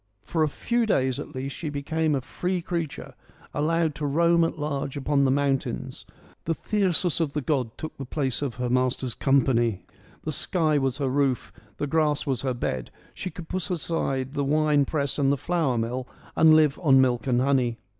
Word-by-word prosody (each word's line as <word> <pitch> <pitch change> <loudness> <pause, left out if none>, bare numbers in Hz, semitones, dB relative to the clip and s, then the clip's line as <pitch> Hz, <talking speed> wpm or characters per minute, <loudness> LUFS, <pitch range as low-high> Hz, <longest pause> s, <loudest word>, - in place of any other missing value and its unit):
For 165 - -1
a 155 - +3
few 235 +9 0
days 130 - +1
at 150 - -8
least 135 +2 -4
she 155 - -4
became 150 +2 0
a 135 - -1
free 180 +7 -2
creature, 170 -4 -4 0.4
allowed 160 +1 +1
to 150 - -4
roam 170 +3 +3
at 165 - -1
large 145 -2 -3
upon 140 0 +2
the - - +3
moun 140 0 +2
tains. 60 - -6 0.4
The 165 - 0
thyrsus 185 -5 0
of 155 -4 0
the 150 - -1
god 130 -5 -1
took 155 - -6
the 135 - -5
place 130 -1 -2
of 140 -5 -2
her 125 0 -2
master's 125 0 0
company: 120 -8 +2 0.4
the 155 - -2
sky 155 -1 +1
was 135 -1 0
her 140 -2 -1
roof: 135 -2 0 0.2
the 145 - -1
grass 150 -1 +1
was 130 -5 -1
her 130 -2 -1
bed: 65 - -3 0.2
she 185 - -5
could 165 0 -9
put 185 +1 -3
aside 140 -6 -2
the 145 -1 -1
wine 150 0 +3
press 140 -1 -1
and 135 -1 +3
the 140 - +1
flour 160 -5 0
mill 125 +3 -2 0.3
and 160 -1 +7
live 155 -2 +4
on 135 -6 +5
milk 125 -1 +2
and 125 -2 +3
honey. 130 -3 +2
140 Hz, 195 wpm, -26 LUFS, 130-160 Hz, 0.4 s, and